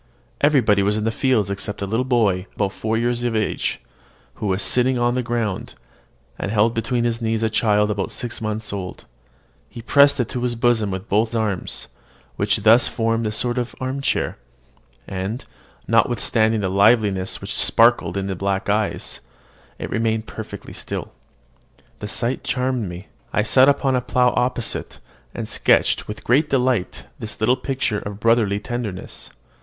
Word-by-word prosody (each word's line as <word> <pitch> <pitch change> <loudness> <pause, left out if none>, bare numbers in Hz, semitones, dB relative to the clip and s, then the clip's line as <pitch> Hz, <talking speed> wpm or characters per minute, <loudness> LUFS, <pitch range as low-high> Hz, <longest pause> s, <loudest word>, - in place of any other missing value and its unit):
Everybody 125 -9 +4
was 105 +2 +1
in 110 - -2
the 115 - +1
fields 110 -5 +1
except 100 +1 -3
a - - 0
little 110 +5 0
boy 105 -7 +1
about 100 -2 0
four 110 +2 -2
years 120 +1 0
of 120 -2 0
age, 110 -1 -1 0.6
who 105 - -1
was 95 +1 0
sitting 125 +1 +2
on 120 0 +2
the 125 - 0
ground, 115 -5 -3 0.6
and - - -2
held 110 +2 +2
between 120 +1 -1
his 120 0 -1
knees 115 0 0
a 110 - +1
child 105 -1 +2
about 100 -2 -2
six 120 -3 -5
months 110 -1 -3
old: 95 -3 -6 0.6
he 115 - -10
pressed 140 +3 +5
it 125 - +1
to 125 - -3
his 120 -1 -1
bosom 115 -3 +2
with 95 +2 -5
both 110 +3 +1
arms, 105 -5 -2 0.5
which 105 - 0
thus 115 +3 +6
formed 115 -1 0
a - - -1
sort 120 +3 0
of 120 0 -4
arm 130 +2 -3
chair; 140 - -1 0.7
and, 95 +6 -4 0.4
notwithstanding 110 -1 +2
the 95 - -1
liveliness 100 -2 +3
which - - -6
sparkled 95 - +3
in 95 0 -2
its 95 -2 -4
black 100 0 -1
eyes, 105 0 -1 0.6
it - - -6
remained 110 -1 0
perfectly 105 -3 -8
still. - - -5 0.9
The 105 - -5
sight 120 +4 -2
charmed 125 -5 -1
me. 90 +3 -9 0.2
I 105 - +2
sat 130 +4 +5
down 145 - +6
upon 135 -2 0
a 125 - +1
plough 125 0 +2
opposite, 125 -1 -2 0.4
and - - -4
sketched - - +2
with 105 - -7
great 145 +6 +3
delight 125 -7 0 0.2
this 105 -1 -6
little 115 +3 +3
picture 130 -6 -2
of 100 0 -7
brotherly 110 -3 +2
tenderness. 110 -4 -5
110 Hz, 170 wpm, -21 LUFS, 105-120 Hz, 0.9 s, thus